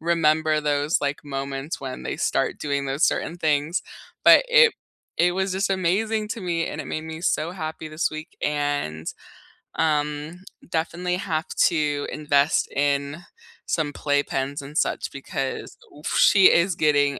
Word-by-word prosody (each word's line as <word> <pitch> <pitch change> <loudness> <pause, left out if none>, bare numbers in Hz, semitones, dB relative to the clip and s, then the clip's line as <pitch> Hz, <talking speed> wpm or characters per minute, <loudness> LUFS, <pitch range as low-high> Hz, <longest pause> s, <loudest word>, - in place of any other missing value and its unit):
remember 155 -2 +2
those, 145 +1 +1
like, 145 +1 -2
moments 135 +1 -4
when 130 -1 -6
they - - -3
start - - 0
doing 140 -1 -2
those 135 +3 -2
certain 170 - 0
things. 155 +2 +1 0.4
But - - +8
it - - +6 0.4
it 175 +1 +3
was 190 +1 -1
just 195 +1 0
amazing 210 +4 0
to 225 - -4
me, 170 -3 -1
and 155 - -5
it 140 - -7
made 155 +3 -4
me 160 0 -7
so 170 -2 0
happy 160 -3 -5
this 155 +2 -1
week, 155 +1 -8
and, 145 - -1 0.7
um, 150 +2 -1 0.3
definitely 175 +2 -1
have 165 -4 -2 0.2
to 150 -4 0
invest 145 -1 +2
in 140 +3 0 0.4
some 155 -3 -1
playpens 145 -1 -1
and 145 +3 -8
such - - 0
because, 135 -1 -5 0.2
oof, 150 - -7
she 195 -2 +6
is 175 +1 +3
getting 145 -3 +2
155 Hz, 150 wpm, -24 LUFS, 145-170 Hz, 0.7 s, But